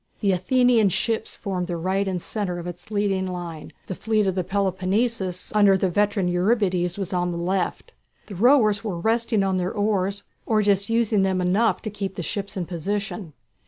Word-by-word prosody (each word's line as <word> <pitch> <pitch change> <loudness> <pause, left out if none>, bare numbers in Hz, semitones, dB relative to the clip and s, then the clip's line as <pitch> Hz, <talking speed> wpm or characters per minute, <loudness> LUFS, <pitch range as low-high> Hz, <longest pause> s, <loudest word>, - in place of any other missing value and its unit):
The 200 -3 +3
Athenian 230 +3 +3
ships 220 +4 -1
formed 185 -4 -3
the 175 - -3
right 190 +4 0
and 180 -3 -2
centre 200 -5 -2
of 175 - -6
its 175 +2 -8
leading 200 -3 0
line, 175 -4 -6
the - - -4
fleet 215 +2 0
of 190 - +1
the 185 0 -1
Peloponnesus 190 +1 -1
under 205 -2 +5
the 190 -1 0
veteran 205 0 +1
Eurybiades 180 -1 +1
was 195 -2 -4
on 180 0 0
the 170 - -4
left. 180 +2 -2 0.3
The 205 - -9
rowers 215 -1 +4
were 200 -6 -3
resting 225 +2 +1
on 190 -1 +1
their 180 0 -1
oars, 200 -1 0 0.2
or 215 -2 +2
just 200 0 +2
using 225 -3 +2
them 190 -1 +1
enough 190 +6 +1
to 215 - -4
keep 195 -2 -4
the 175 - -4
ships 200 +5 -4
in 180 - -2
position. 190 0 -4
195 Hz, 190 wpm, -24 LUFS, 180-210 Hz, 0.3 s, under